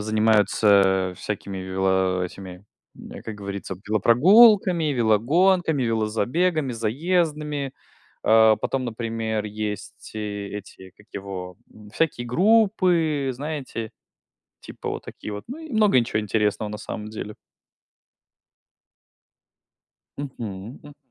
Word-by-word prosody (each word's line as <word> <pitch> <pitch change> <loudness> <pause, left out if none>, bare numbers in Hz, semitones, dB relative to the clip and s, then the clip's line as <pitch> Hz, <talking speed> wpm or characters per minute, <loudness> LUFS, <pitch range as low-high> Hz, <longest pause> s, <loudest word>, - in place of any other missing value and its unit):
занимаются, 105 -3 +3
э, - - -13
всякими 100 0 -5
вело 95 0 0
этими, 90 +1 -9 0.3
м, - - -10
как 110 - -6
говорится, 100 -2 -6
велопрогулками, 175 - +5
велогонками, 140 - +2
велозабегами, 125 - 0
заездами. 150 +3 -1 0.5
А, 110 -1 +6
потом, 130 +4 -2
например, 115 -2 -3
есть 105 -1 -6
э 105 -2 -4
эти, 95 -2 -13
как 105 - -20
его, 95 -2 -7 0.2
м, 105 -1 -15
всякие 120 -2 -1
группы, 175 - +2
знаете? 130 -5 -5 0.7
Типа - - -8
вот - - -5
такие 105 - -8
вот. 105 - -6
Ну, 260 - -7
и 320 -2 -10
много 210 -9 +4
и 120 - +3
чё 105 - -1
интересного, 105 0 -1
на 105 - -6
самом 105 0 -7
деле. 105 -1 -7 2.8
Мгм, 115 -5 -7
м. 145 0 -14
110 Hz, 110 wpm, -24 LUFS, 105-145 Hz, 2.8 s, А